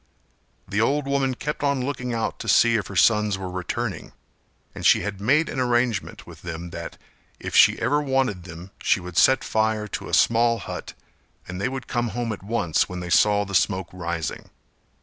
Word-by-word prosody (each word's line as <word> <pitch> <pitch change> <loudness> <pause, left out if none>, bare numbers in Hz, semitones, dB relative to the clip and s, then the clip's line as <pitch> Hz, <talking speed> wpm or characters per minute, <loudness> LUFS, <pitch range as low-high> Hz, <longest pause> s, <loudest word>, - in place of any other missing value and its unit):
The 100 +2 0
old 140 +5 +1
woman 135 -2 0
kept 150 +4 -4
on 140 -3 +1
looking 130 -3 -3
out 115 -1 -2
to - - -7
see 115 0 +5
if 105 - -1
her - - -9
sons 105 -3 +3
were 95 -1 -6
returning, 90 -1 -4 0.6
and - - -8
she - - +5
had 100 -1 -5
made 150 +10 +3
an 135 - -4
arrangement 120 -3 0
with - - -13
them 85 0 -7
that - - -7 0.4
if - - -5
she - - +6
ever 145 +5 +1
wanted 130 -9 0
them 90 +2 -10
she - - +2
would 90 -1 -9
set 130 -2 +4
fire 110 -1 0
to - - -5
a - - +2
small 115 0 +3
hut - - -7 0.5
and 90 +1 -6
they 130 - 0
would 130 -1 -6
come 120 -1 -1
home 120 -2 -1
at 105 - -9
once 95 -6 0
when 90 0 -5
they 90 -1 -6
saw 105 +1 +4
the 100 - -8
smoke 95 -1 +1
rising. 85 -3 -4
110 Hz, 195 wpm, -24 LUFS, 95-125 Hz, 0.6 s, she